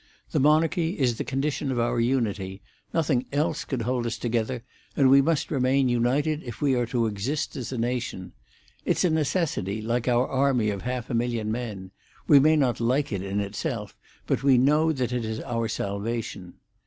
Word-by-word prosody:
The - - +1
monarchy 160 +4 +2
is 125 -5 +1
the - - 0
condition 140 +1 -2
of 125 - -2
our 120 0 +1
unity; 105 -6 -1 0.3
nothing 145 -6 +1
else 150 +3 0
could 130 -5 -3
hold 120 0 -1
us 115 - -3
together, 120 +1 -2 0.3
and 135 -2 +5
we 140 0 +8
must 155 +1 0
remain 135 -1 +2
united 135 +6 +1
if 120 -6 -8
we 140 -2 +2
are 120 -2 +1
to 120 -1 0
exist 110 +8 -2
as 125 -3 -5
a 130 - -3
nation. 120 -6 -3 0.5
It's - - +1
a 180 - +3
necessity, 150 - 0
like 115 +3 -2
our 125 +1 +3
army 130 -5 +2
of 100 -2 -5
half 125 0 -4
a - - -2
million 115 -2 -1
men. 105 -6 -5 0.4
We 145 - +8
may 155 +3 +5
not 135 -5 +1
like 130 +5 +1
it 95 - -2
in 100 +1 -2
itself, 105 - -4 0.3
but - - 0
we 135 -2 +5
know 150 +5 +4
that 130 -4 -2
it 125 -1 -1
is 110 0 -3
our 115 -1 -2
salvation." 100 -3 -4
125 Hz, 190 wpm, -26 LUFS, 115-140 Hz, 0.5 s, we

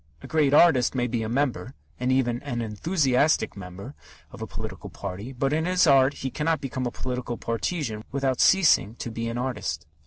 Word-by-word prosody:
A - - -8
great 155 -3 +2
artist 145 -5 +5
may 125 -1 +1
be 120 -1 -2
a 110 - -3
member 130 0 -1 0.2
and 125 +1 0
an 120 -2 0
enthusiastic 135 - +1
member 100 +6 -9 0.4
of - - -11
a - - -4
political - - -7
party, 100 +5 -7
but 135 +2 -1
in 160 +1 0
his 180 0 +3
art 135 -2 +5
he 130 - -1
cannot 160 +3 0
become 130 -2 -3
a - - -4
political 125 -2 -4
partisan 115 - -3
without 135 -2 0
ceasing 165 - +4
to 120 - -6
be 115 +1 -4
an 115 - -4
artist. 120 - -3
130 Hz, 185 wpm, -25 LUFS, 115-145 Hz, 0.4 s, artist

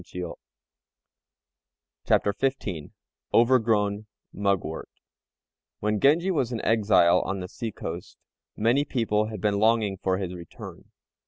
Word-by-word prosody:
] - - -49
CHAPTER 100 - +3
XV 105 - -2 0.4
OVERGROWN 110 -4 +3 0.3
MUGWORT 100 -5 -1 0.9
When 105 0 0
Genji 165 - +4
was 130 -8 0
an 115 - -2
exile 100 -6 +4
on 95 0 -3
the 90 - -5
sea 115 +4 -5
coast, 85 -2 -7 0.4
many 120 +6 +3
people 110 -6 0
had 110 -2 -6
been 100 +1 +1
longing 110 -2 +2
for 95 0 0
his 95 -2 -4
return. 85 -2 -10
105 Hz, 115 wpm, -26 LUFS, 95-115 Hz, 0.9 s, Genji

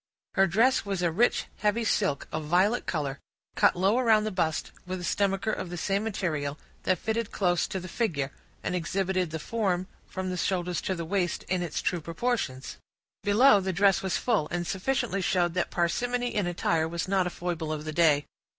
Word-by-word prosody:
Her 195 0 +4
dress 230 +9 +3
was 195 -3 -2
a 170 - +2
rich, 230 +9 +2
heavy 210 +2 +1
silk, 195 -9 0
of 155 0 -3
violet 185 +9 +2
color, 140 -4 -2 0.4
cut - - +4
low 195 +7 +3
around 220 -4 +4
the 215 - -2
bust, 165 -5 -1 0.2
with 185 0 -3
a - - -7
stomacher 195 +3 +1
of 185 - -4
the 175 - -5
same 200 +3 0
material, 155 -9 -2 0.3
that 185 - +3
fitted 220 +3 -2
close 175 -3 +1
to 190 - -3
the 185 - -8
figure, 165 - -1 0.3
and - - -2
exhibited 185 +1 0
the 160 - -3
form, 185 0 -1 0.2
from 190 -1 -4
the 180 - -3
shoulders 180 -1 -1
to 190 - -1
the 170 -1 -4
waist 180 -1 -1
in 185 -1 -1
its 160 -3 -3
true 175 - 0
proportions. 165 - -2 0.4
Below, 210 +2 +6
the 190 0 -2
dress 195 +2 +4
was 190 -2 0
full, 215 -11 +1
and 175 0 -2
sufficiently 195 +1 -1
showed 175 -2 +1
that 180 -1 0
parsimony 245 +8 0
in 205 -4 0
attire 165 -2 +1
was 170 +1 -3
not 190 -1 +2
a - - -1
foible 170 -3 -3
of 155 0 -4
the 155 - -4
day. 150 -3 +4
185 Hz, 195 wpm, -28 LUFS, 170-205 Hz, 0.4 s, Below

